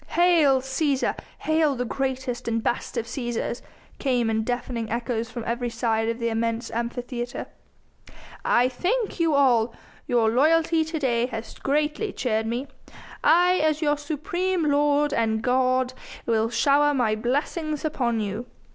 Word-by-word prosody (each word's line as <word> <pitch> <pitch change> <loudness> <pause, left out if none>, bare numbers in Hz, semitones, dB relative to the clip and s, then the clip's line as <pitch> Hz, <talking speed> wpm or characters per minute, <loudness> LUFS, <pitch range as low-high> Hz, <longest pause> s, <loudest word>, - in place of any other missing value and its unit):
"Hail 325 -7 +5
Cæsar! 265 +1 0 0.3
Hail 315 -2 +2
the 250 0 -2
greatest 260 -1 -3
and 230 -1 0
best 240 - -2
of 230 - -1
Cæsars!" 240 0 -3 0.4
came 245 -5 +1
in 220 0 +1
deafening 240 -1 -3
echoes 235 0 -2
from 235 - -6
every 240 +1 -2
side 225 -1 0
of 230 - -2
the 235 -1 -1
immense 230 +1 -2
Amphitheatre. 240 +1 -4 1.0
"I 245 +1 +4
thank 385 - -1
you 330 -3 +3
all! 245 -5 +3 0.3
Your 230 -3 +3
loyalty 320 +5 +3
to 320 +1 -4
day 245 -4 +1
has 225 -2 -6
greatly 300 +9 -1
cheered 220 -3 -1
me. 240 +4 -2 0.6
I 355 +4 +5
as 310 0 +1
your 295 -1 +3
supreme 315 +3 -1
lord 290 0 +2
and 220 -1 0
god 255 0 +2 0.3
will 225 -1 +1
shower 290 +4 +3
my 235 -5 +2
blessings 290 +7 -2
upon 240 -6 0
you. 210 +3 -3
255 Hz, 145 wpm, -25 LUFS, 235-295 Hz, 1.0 s, Hail